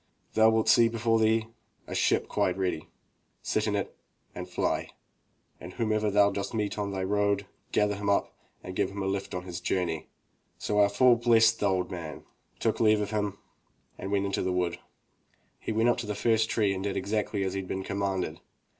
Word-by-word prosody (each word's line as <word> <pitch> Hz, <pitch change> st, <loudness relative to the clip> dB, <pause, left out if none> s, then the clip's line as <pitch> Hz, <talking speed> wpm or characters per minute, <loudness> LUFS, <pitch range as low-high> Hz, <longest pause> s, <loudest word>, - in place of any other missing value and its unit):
Thou 110 Hz, 0 st, +6 dB
wilt 110 Hz, 0 st, +1 dB
see 120 Hz, -5 st, +6 dB
before 115 Hz, 0 st, +1 dB
thee 110 Hz, 0 st, +3 dB, 0.4 s
a -, -, -7 dB
ship -, -, +2 dB
quite 90 Hz, 0 st, 0 dB
ready. 90 Hz, -4 st, -2 dB, 0.6 s
Sit -, -, 0 dB
in -, -, 0 dB
it -, -, -3 dB, 0.4 s
and -, -, -7 dB
fly, -, -, -1 dB, 0.7 s
and 90 Hz, -, -9 dB
whomsoever 110 Hz, -2 st, 0 dB
thou 100 Hz, 0 st, +4 dB
dost 100 Hz, +3 st, -4 dB
meet 105 Hz, -1 st, -2 dB
on 100 Hz, -1 st, -1 dB
the 95 Hz, -1 st, -2 dB
road, 100 Hz, 0 st, +1 dB, 0.3 s
gather 105 Hz, 0 st, +2 dB
him 100 Hz, 0 st, -3 dB
up 100 Hz, -, +1 dB, 0.3 s
and 90 Hz, -, -7 dB
give 100 Hz, -1 st, +1 dB
him 100 Hz, 0 st, -5 dB
a -, -, -1 dB
hft 95 Hz, -1 st, -2 dB
on 90 Hz, -, -6 dB
his 90 Hz, -2 st, -6 dB
journey." 85 Hz, -4 st, -1 dB, 0.5 s
So 105 Hz, 0 st, -1 dB
our 100 Hz, -1 st, +5 dB
fool 120 Hz, +4 st, +5 dB
blessed 115 Hz, -1 st, +4 dB
the 100 Hz, -, +2 dB
old 90 Hz, -2 st, -1 dB
man, 85 Hz, -4 st, -6 dB, 0.4 s
took -, -, 0 dB
leave 110 Hz, -2 st, +4 dB
of 105 Hz, 0 st, -2 dB
him, 105 Hz, -2 st, -1 dB, 0.6 s
and 95 Hz, -, -5 dB
went 100 Hz, -1 st, +1 dB
into 100 Hz, -, -1 dB
the 95 Hz, -, 0 dB
wood. 90 Hz, -1 st, -1 dB, 0.8 s
He -, -, -4 dB
went 110 Hz, +2 st, +2 dB
up 120 Hz, -, +2 dB
to 110 Hz, -, -5 dB
the 105 Hz, -, -2 dB
first 110 Hz, 0 st, +2 dB
tree 105 Hz, -4 st, +2 dB
and 95 Hz, 0 st, -4 dB
did 100 Hz, -1 st, -2 dB
exactly 100 Hz, +1 st, -1 dB
as 95 Hz, -1 st, -2 dB
he 95 Hz, -, -2 dB
had 95 Hz, -, -6 dB
been 95 Hz, 0 st, -3 dB
commanded. 95 Hz, -4 st, -2 dB
100 Hz, 205 wpm, -28 LUFS, 95-110 Hz, 0.8 s, Thou